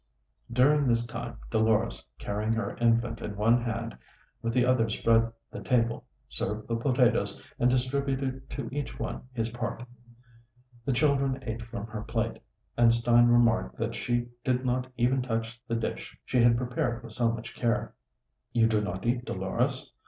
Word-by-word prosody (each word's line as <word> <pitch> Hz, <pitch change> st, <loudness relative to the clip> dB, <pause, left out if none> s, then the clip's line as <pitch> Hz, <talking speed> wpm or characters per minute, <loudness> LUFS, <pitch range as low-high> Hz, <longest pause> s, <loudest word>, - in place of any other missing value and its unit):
During 140 Hz, +4 st, +4 dB
this 120 Hz, -1 st, +2 dB
time 120 Hz, 0 st, -6 dB
Dolores, 110 Hz, 0 st, +2 dB
carrying 105 Hz, -, -1 dB
her 115 Hz, -3 st, -2 dB
infant 115 Hz, -1 st, +2 dB
in 105 Hz, -, -5 dB
one 115 Hz, +4 st, +3 dB
hand, 115 Hz, 0 st, -3 dB, 0.5 s
with 115 Hz, -, -1 dB
the 125 Hz, +1 st, +3 dB
other 125 Hz, -3 st, +3 dB
spread 115 Hz, +1 st, +3 dB, 0.2 s
the -, -, -7 dB
table, 115 Hz, -2 st, +1 dB, 0.2 s
served 105 Hz, +2 st, -4 dB
the 115 Hz, -, 0 dB
potatoes, 125 Hz, +1 st, +2 dB, 0.2 s
and 125 Hz, -, +4 dB
distributed 130 Hz, +1 st, -1 dB
to 135 Hz, -4 st, -5 dB
each 145 Hz, -3 st, -4 dB
one 115 Hz, -, -4 dB
his 115 Hz, -2 st, -2 dB
part. 120 Hz, 0 st, -4 dB, 1.0 s
The 135 Hz, -, +1 dB
children 135 Hz, -1 st, +2 dB
ate 115 Hz, -1 st, -4 dB
from 115 Hz, -2 st, -6 dB
her 110 Hz, -1 st, -6 dB
plate, 115 Hz, +1 st, -2 dB, 0.3 s
and 120 Hz, -1 st, +6 dB
Stein 120 Hz, +1 st, +5 dB
remarked 115 Hz, -, +3 dB
that -, -, -2 dB
she 120 Hz, 0 st, -1 dB
did 130 Hz, 0 st, 0 dB
not 125 Hz, +1 st, -1 dB
even 125 Hz, +2 st, +2 dB
touch 115 Hz, -1 st, -3 dB
the 115 Hz, -, -1 dB
dish 115 Hz, -, -4 dB
she 125 Hz, -, +2 dB
had 120 Hz, 0 st, +5 dB
prepared 120 Hz, -1 st, -2 dB
with 115 Hz, -, -7 dB
so 115 Hz, 0 st, +1 dB
much 115 Hz, +1 st, -6 dB
care. 115 Hz, -2 st, 0 dB, 0.6 s
"You 115 Hz, -2 st, +4 dB
do 110 Hz, -2 st, +2 dB
not 95 Hz, -1 st, -4 dB
eat, 120 Hz, +1 st, +1 dB
Dolores?" -, -, -1 dB
120 Hz, 165 wpm, -28 LUFS, 115-125 Hz, 1.0 s, and